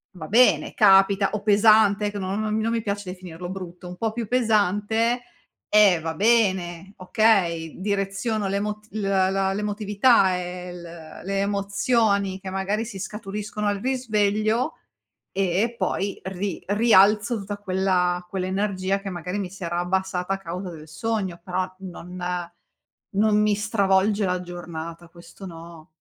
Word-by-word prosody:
va 160 -3 -8
bene 245 +7 +4
capita 195 -1 +5
o 210 - -3
pesante 210 0 +4
che 205 - -5
non 195 +2 -2
non 215 0 -1
mi 220 - 0
non 230 - 0
mi 230 - 0
piace 205 -2 -4
definirlo 180 -1 -8
brutto, 180 -1 -8
un 180 - -9
po' 225 +2 -1
più 230 -1 -4
pesante, 225 0 +1 0.5
eh, 205 -5 +5
va 160 0 -4
bene, 190 -4 +1
okay. 180 -5 +1
Direziono 200 +2 -1
l'emot 210 +2 -3
l 215 - -4
la 195 0 +1
l'emotività 210 0 +2
e 180 0 -6
l 175 - -9 0.4
le 195 0 -1
emozioni 200 0 +1
che 190 - -7
magari 195 +4 -1
si 200 -4 -8
scaturiscono 210 +1 -4
al 205 -1 0
risveglio, 220 +1 0 0.6
e 195 +5 0
poi 200 -3 -2
ri 190 -1 -4
rialzo 210 +1 +4
tutta 200 +1 -5
quella 185 -2 0
quell'energia 190 0 -1
che 195 - -5
magari 180 +2 -4
mi 190 -3 -3
si 190 +1 -10
era 170 0 -2
abbassata 190 +1 -1
a - - -2
causa 180 0 -6
del 155 -2 -11
sogno. 195 -2 -3
Però, 185 0 -2
non 180 -1 -9 1.0
non 210 +1 +3
mi 210 -1 +3
stravolge 205 -1 +2
la 180 -1 -1
giornata, 170 -1 -8
questo 170 +3 -13
no. 165 -2 -11
195 Hz, 145 wpm, -24 LUFS, 185-210 Hz, 1.0 s, capita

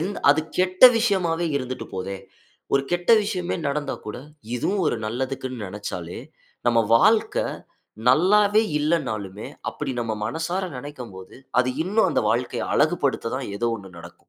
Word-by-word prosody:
என் 190 +5 -2 0.2
அது 145 +2 +3 0.2
கெட்ட 185 +2 0 0.2
விஷயமாவே 175 -7 +1
இருந்துட்டு 130 -1 -4
போதே. 95 +1 -4 0.6
ஒரு 140 - +3
கெட்ட 175 +4 +1
விஷயமே 180 -4 -2
நடந்தா 145 0 -2
கூட, 105 - -5 0.4
இதுவும் 190 +10 0
ஒரு 120 - +1
நல்லதுக்குன்னு 130 0 -4
நெனைச்சாலே, 90 -3 -6 0.5
நம்ம 120 -1 +4 0.2
வாழ்க்க 215 - +2 0.4
நல்லாவே 205 +9 +5 0.2
இல்லனாலுமே, 110 - -2 0.2
அப்டி 140 -3 -4
நம்ம 115 -2 -2
மனசார 165 - -2
நினைக்கும் 125 -4 -8
போது, 95 0 -11 0.2
அது 125 0 +3
இன்னும் 210 +5 +2
அந்த - - +2
வாழ்க்கைய 120 +2 -1
அழகுபடுத்ததா 140 -6 +1 0.2
ஏதோ 120 - -1
1 100 -3 -11
நடக்கும். - - -14
140 Hz, 135 wpm, -24 LUFS, 115-180 Hz, 0.6 s, நல்லாவே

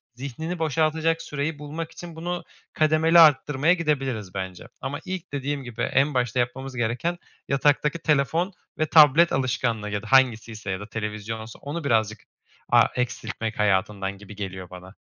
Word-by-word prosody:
zihnini 150 +7 -5
boşaltacak 160 +1 +1
süreyi 150 0 -3
bulmak 155 +2 -6
için 170 -2 -10
bunu 175 +2 -4 0.3
kademeli 155 +2 +4
arttırmaya 150 0 +5
gidebiliriz 135 - -2
bence. 95 -2 -6
Ama 145 +2 -4
ilk 185 -3 -6
dediğim 140 0 -2
gibi 120 -1 -7
en 140 +2 +2
başta 125 0 0
yapmamız 130 +2 -2
gereken, 125 +9 -1 0.3
yataktaki 145 +3 +2
telefon 160 +5 +1 0.3
ve 155 - +3
tablet 155 +2 +6
alışkanlığı 120 -5 -1
ya 105 0 -3
da - - -9
hangisiyse 115 -5 +2
ya 95 - -3
da 105 - -8
televizyonsa 110 +1 -5
onu 150 +4 -5
birazcık 110 -5 +1 0.5
a - - +7
eksiltmek 110 -2 -3
hayatından 100 -1 0
gibi 105 +1 -12
geliyor 95 -3 -6
bana. 90 +2 -12
135 Hz, 145 wpm, -25 LUFS, 110-155 Hz, 0.5 s, a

